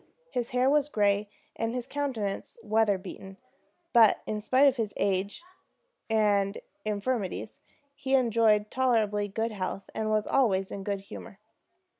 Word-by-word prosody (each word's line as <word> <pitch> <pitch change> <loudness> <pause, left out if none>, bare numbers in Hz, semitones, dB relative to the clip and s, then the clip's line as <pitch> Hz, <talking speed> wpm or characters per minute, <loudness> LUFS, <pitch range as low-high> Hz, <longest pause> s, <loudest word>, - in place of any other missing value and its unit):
His 240 -1 -2
hair 250 +1 +2
was 295 +1 +3
gray, 205 -3 +1 0.3
and 225 +1 -2
his 250 -1 -3
countenance 250 -9 -3
weather 215 -2 +2
beaten; 190 0 -10 0.6
but 230 -4 +6
in 215 -1 -3
spite 260 +6 +4
of 275 -2 +4
his 220 -3 -2
age 195 - -1 0.7
and 205 -2 +2 0.3
infirmities 215 0 -3 0.3
he 270 -1 0
enjoyed 225 -4 +3
tolerably 220 -5 +1
good 225 +3 -2
health, 195 -1 -5
and 220 0 -2
was 215 -1 +1
always 195 -8 +1
in 195 - -5
good 200 -1 -2
humor. 195 0 -10
215 Hz, 140 wpm, -28 LUFS, 200-245 Hz, 0.7 s, but